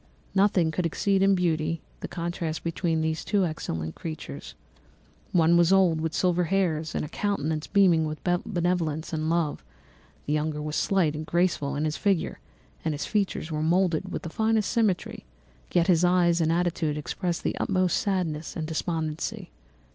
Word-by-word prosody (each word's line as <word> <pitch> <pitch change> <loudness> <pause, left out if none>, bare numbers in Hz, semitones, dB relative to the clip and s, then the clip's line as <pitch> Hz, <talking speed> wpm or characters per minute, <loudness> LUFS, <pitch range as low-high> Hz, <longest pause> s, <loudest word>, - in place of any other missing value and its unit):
Nothing 190 -4 +3
could 170 +2 0
exceed 195 +4 +1
in 195 0 +5
beauty 165 -2 0 0.2
the - - -5
contrast 170 -2 -4
between 165 -1 0
these 160 0 -1
two 200 -3 +2
excellent 80 - -4
creatures. 145 - -7 0.8
One 170 0 +4
was 170 +1 +4
old, 180 -5 +4
with 160 0 -2
silver 180 -1 +2
hairs 165 -4 0
and - - -1
a - - -6
countenance 160 -4 -2
beaming 180 -5 +4
with 155 0 -4
benevolence 175 -4 -1
and 155 0 -1
love; 165 -3 0 0.6
the 150 - -1
younger 150 0 -1
was 150 0 -4
slight 180 -6 +2
and 155 - -4
graceful 170 -4 0
in 150 +2 -1
his 155 0 -1
figure, 195 -4 0 0.4
and 155 -2 -1
his 150 - -3
features 200 -6 -1
were 155 0 -1
moulded 175 +2 +1
with - - -4
the 165 - -5
finest 220 0 +1
symmetry, 215 -7 0 0.5
yet 170 -1 +3
his 175 -2 +3
eyes 175 -1 +3
and 160 0 +2
attitude 165 -3 0
expressed 170 +3 -3
the - - -1
utmost 185 -3 +1
sadness 170 -6 -2
and 160 - -3
despondency. 160 0 -3
170 Hz, 165 wpm, -26 LUFS, 155-185 Hz, 0.8 s, in